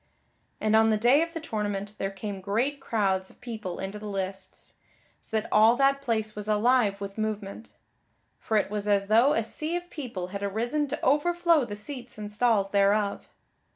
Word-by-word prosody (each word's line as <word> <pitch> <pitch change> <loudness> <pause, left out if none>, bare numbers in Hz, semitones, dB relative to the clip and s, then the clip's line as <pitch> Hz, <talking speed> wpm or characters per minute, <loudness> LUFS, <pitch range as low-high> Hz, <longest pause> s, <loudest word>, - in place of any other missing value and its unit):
And 215 0 +2
on 220 0 +5
the 215 - +3
day 245 +7 +4
of 335 0 -1
the - - -2
tournament 205 -7 -3
there 195 - -1
came 195 0 -6
great 235 +9 -1
crowds 195 -7 0
of - - -20
people 220 -7 -6
into 195 +2 -5
the 210 - -7
lists, 190 -1 -5 0.5
so 220 - -1
that - - -7
all 220 +2 +6
that 275 +1 +3
place 220 -5 -1
was 210 0 -6
alive 215 -1 +2
with 200 +1 -6
movement. 215 0 -4 0.7
For 220 - 0
it 205 - 0
was 210 -1 -3
as 200 -1 +2
though 235 +7 +5
a 225 - +1
sea 310 +9 -3
of 350 0 -5
people 225 - -5
had 200 +1 -6
arisen 235 +9 -1
to 295 +3 -4
overflow 335 +1 +3
the 205 -3 -6
seats 240 +3 -7
and 210 -1 -7
stalls 210 -3 +2
thereof. 200 0 +1
215 Hz, 190 wpm, -27 LUFS, 200-250 Hz, 0.7 s, all